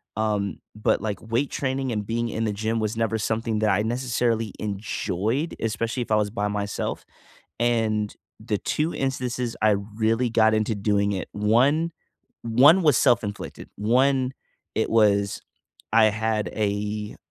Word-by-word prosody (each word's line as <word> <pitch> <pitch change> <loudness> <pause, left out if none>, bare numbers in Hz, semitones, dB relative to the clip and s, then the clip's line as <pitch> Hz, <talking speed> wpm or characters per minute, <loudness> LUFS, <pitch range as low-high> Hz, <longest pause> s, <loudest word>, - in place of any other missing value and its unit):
Um, 105 -2 -1
but, 105 - +1
like, 105 0 -4
weight 115 +5 -1
training 130 -1 -2
and 105 -2 -1
being 115 +1 -1
in 115 +1 -2
the 110 - 0
gym 110 +3 -1
was 110 +1 -2
never 115 -1 0
something 110 0 -1
that 110 -1 +2
I 105 +2 +2
necessarily 115 -2 0
enjoyed, 105 - -2
especially 115 +3 -2
if 120 - -5
I 110 - +3
was 105 -1 +1
by 105 -2 -1
myself, 100 0 -3 0.5
and 110 -3 +1 0.2
the 110 -2 -2
2 155 +3 -1
instances 125 -3 -2
I 110 - +5
really 110 +4 0
got 110 -1 +4
into 110 0 +1
doing 100 0 +1
it, 95 - -4
one 130 +11 +2 0.5
one 140 +11 +6
was 150 -5 +4
self-inflicted. 105 -6 0
One, 130 +4 +2 0.4
it - - +1
was 100 -3 +3 0.5
I 110 0 +6
had 110 0 +1
a 105 0 -2
110 Hz, 150 wpm, -24 LUFS, 105-120 Hz, 0.5 s, one